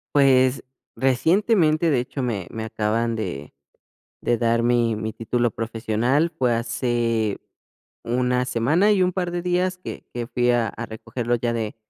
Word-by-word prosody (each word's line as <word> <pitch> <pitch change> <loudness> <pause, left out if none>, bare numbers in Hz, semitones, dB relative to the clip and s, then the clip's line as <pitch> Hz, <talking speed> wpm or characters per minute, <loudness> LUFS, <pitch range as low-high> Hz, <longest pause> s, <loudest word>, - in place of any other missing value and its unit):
Pues, 130 -2 +4 0.3
recientemente, 160 - +2
de 135 - +3
hecho, 130 +2 -4
me 105 -7 -2
me 110 - -5
acaban 110 +1 -1
de 75 -11 -5 0.7
de 120 -1 +1
dar 115 0 +1
mi 120 -2 +2
mi 110 0 -4
título 120 +1 -1
profesional. 115 +7 0
Fue 125 -2 +2
hace 115 -2 -1 0.6
una 125 +1 0
semana 145 - +2
y 200 -3 +3
un 180 - +3
par 180 -1 -2
de 175 - -2
días 180 +1 0
que 180 - -8
que 120 -1 -4
fui 125 -1 +1
a 120 -2 +2
a 115 +3 -6
recogerlo 115 +2 -3
ya 120 0 -1
de 110 -2 -3
120 Hz, 155 wpm, -23 LUFS, 115-140 Hz, 0.7 s, Pues